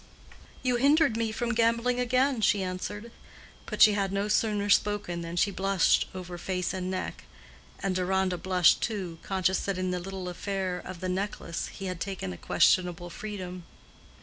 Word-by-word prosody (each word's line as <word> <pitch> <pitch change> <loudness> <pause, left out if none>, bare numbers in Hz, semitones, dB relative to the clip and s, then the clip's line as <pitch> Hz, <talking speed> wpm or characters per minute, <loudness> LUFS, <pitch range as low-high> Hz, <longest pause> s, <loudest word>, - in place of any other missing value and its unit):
"You 250 -2 +2
hindered 285 0 +4
me 225 -1 0
from 240 +2 -1
gambling 235 +2 +2
again," 255 0 +2
she 205 -2 +3
answered. 205 +5 -5 0.6
But - - +4
she 215 - +7
had 195 -2 0
no 200 +1 -1
sooner 210 -1 +1
spoken 205 -4 +1
than 170 0 -5
she 200 +3 +2
blushed 195 -2 +2
over 180 -1 -7
face 180 +1 -2
and 185 -1 -3
neck; 185 0 -4 0.6
and 195 - +1
Deronda 185 0 0
blushed, 180 -3 +4
too, 185 -7 -3
conscious 190 -1 0
that 195 -2 -2
in 185 0 -1
the 180 - -1
little 190 0 -6
affair 185 0 -3
of 185 -2 -8
the 185 - -2
necklace 185 -2 -3
he 195 - -8
had 185 -2 -4
taken 185 - -4
a - - -9
questionable 175 - +2
freedom. 185 -4 -6
190 Hz, 170 wpm, -28 LUFS, 180-210 Hz, 0.6 s, she